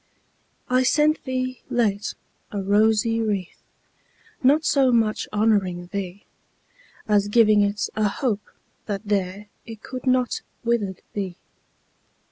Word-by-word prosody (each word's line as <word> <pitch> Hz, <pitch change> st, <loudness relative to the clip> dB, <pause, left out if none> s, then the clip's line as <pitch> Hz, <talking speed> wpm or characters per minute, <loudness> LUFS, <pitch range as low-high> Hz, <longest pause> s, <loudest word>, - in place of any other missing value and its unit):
I 255 Hz, 0 st, +3 dB
sent 300 Hz, +4 st, +2 dB
thee, 255 Hz, -1 st, -3 dB
late, 215 Hz, -4 st, 0 dB, 0.4 s
a 205 Hz, -, -3 dB
rosy 220 Hz, +3 st, +2 dB
wreath, 200 Hz, -5 st, -3 dB, 0.8 s
Not 290 Hz, +4 st, +4 dB
so 270 Hz, -3 st, +4 dB
much 225 Hz, -3 st, +1 dB
honouring 200 Hz, -5 st, +1 dB
thee, 195 Hz, -1 st, -5 dB, 0.8 s
As 205 Hz, -1 st, +3 dB
giving 215 Hz, -1 st, +5 dB
it 205 Hz, 0 st, 0 dB
a 215 Hz, -1 st, +2 dB
hope, 215 Hz, -2 st, -2 dB, 0.4 s
that 200 Hz, -1 st, -3 dB
there 200 Hz, 0 st, -1 dB, 0.2 s
It 225 Hz, -2 st, -10 dB
could 255 Hz, 0 st, -7 dB
not 255 Hz, -1 st, +2 dB, 0.2 s
withered 220 Hz, -6 st, -1 dB
be. 190 Hz, -3 st, -4 dB
215 Hz, 115 wpm, -23 LUFS, 200-245 Hz, 0.8 s, giving